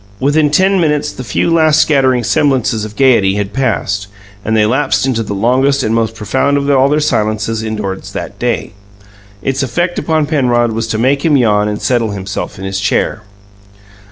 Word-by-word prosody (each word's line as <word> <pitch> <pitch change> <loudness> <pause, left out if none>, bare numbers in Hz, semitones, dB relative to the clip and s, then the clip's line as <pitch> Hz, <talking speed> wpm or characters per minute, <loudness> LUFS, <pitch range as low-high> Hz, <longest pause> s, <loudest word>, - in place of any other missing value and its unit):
Within 145 +3 +2
ten 190 +5 +2
minutes 150 -2 0
the 130 - -8
few 125 +9 0
last 155 -2 +3
scattering 130 -5 +2
semblances 125 -4 +1
of 105 0 -10
gayety 115 -8 +3
had 105 -1 -3
passed, 100 -7 -1 0.4
and 110 0 0
they 105 - +3
lapsed 130 +4 +1
into 125 -4 0
the 105 -2 -4
longest 130 +6 +1
and 110 - 0
most 115 -1 0
profound 130 +7 0
of 140 0 -2
all 135 0 +3
their 150 +1 +2
silences 110 -6 -1
indoors 105 -3 -5
that - - -7
day. - - -2 0.7
Its 135 0 -1
effect 175 +7 -1
upon 160 -2 0
Penrod 125 -6 +1
was 115 +1 -3
to 110 - -2
make 135 +5 +1
him 155 -3 +3
yawn 105 -4 +2
and 105 0 -4
settle 115 -4 0
himself 95 -1 -5
in 95 - -7
his 95 0 -3
chair. 105 +2 -1
125 Hz, 185 wpm, -14 LUFS, 110-140 Hz, 0.7 s, last